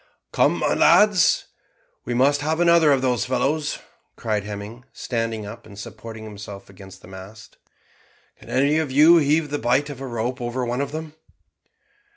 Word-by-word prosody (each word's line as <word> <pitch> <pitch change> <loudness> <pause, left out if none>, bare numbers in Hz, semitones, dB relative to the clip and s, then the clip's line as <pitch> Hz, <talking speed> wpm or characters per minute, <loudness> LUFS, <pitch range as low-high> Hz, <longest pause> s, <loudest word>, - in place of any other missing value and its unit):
"Come, - - +2
my - - 0
lads, 205 -4 +4 0.6
we 120 - -3
must 140 +3 +2
have 155 +3 -1
another 170 -3 +5
of 135 -2 +2
those 125 -5 0
fellows," 145 +4 -1 0.4
cried 105 -3 -2
Hemming, 105 +4 -8
standing 115 -3 -4
up, 115 +2 -10
and 100 -2 -14
supporting 110 +2 -9
himself 100 -2 -10
against 95 0 -14
the - - -13
mast. 95 +4 -12 0.8
"Can - - -15
any 140 +4 +2
of 160 -3 -2
you 155 +6 +6
heave 150 0 +1
the 145 - -2
bight 130 +5 0
of 135 -2 -10
a 135 - -5
rope 120 +2 -4
over 120 +1 -3
one 120 +3 -2
of 140 0 -4
them?" 155 0 -7
125 Hz, 170 wpm, -22 LUFS, 110-145 Hz, 0.8 s, you